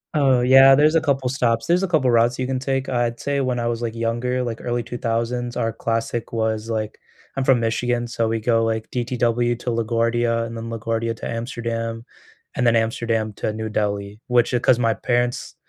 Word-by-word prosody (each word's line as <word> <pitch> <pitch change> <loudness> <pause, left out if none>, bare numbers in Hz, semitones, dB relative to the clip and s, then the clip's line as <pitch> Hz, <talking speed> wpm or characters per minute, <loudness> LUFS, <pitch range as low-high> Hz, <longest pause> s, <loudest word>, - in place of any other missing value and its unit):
Oh, 135 -4 +3
yeah, 135 +2 +7
there's 150 +3 +4
a 165 - +3
couple 135 -4 0
stops. 115 -3 0
There's 175 +2 +2
a 195 - 0
couple 155 -7 +2
of 120 - +2
routes 120 +1 +3
you 130 - -2
can 130 0 -2
take, 135 0 -2
I'd 120 -2 -1
say, 140 0 -1
when 125 -2 -1
I 120 - -2
was, 120 0 -2
like, 115 -1 -3
younger, 120 +2 -1
like, 115 -2 -4
early 120 -1 -2
2000s, 120 +1 -3
our 115 -1 -1
classic 115 0 -3
was, 110 -1 -2
like 110 -1 -3 0.4
I'm 135 - -1
from 130 -2 +4
Michigan, 120 +1 -1
so 115 -1 -1
we 115 0 -1
go, 115 0 +2
like, 110 -1 -2
DTW 120 -1 0
to - - -4
LaGuardia, 115 0 0
and 115 0 -7
then 115 0 -6
LaGuardia 115 0 -2
to - - -7
Amsterdam, 115 -1 -4 0.5
and 120 - +1
then 115 - +4
Amsterdam 115 -1 0
to - - -2
New 110 0 -4
Delhi, 105 -1 -2
which, 120 -1 +2
uh, 125 - +2
'cause 120 0 +3
my 115 -2 +2
parents 120 +3 -1
120 Hz, 205 wpm, -22 LUFS, 115-125 Hz, 0.5 s, yeah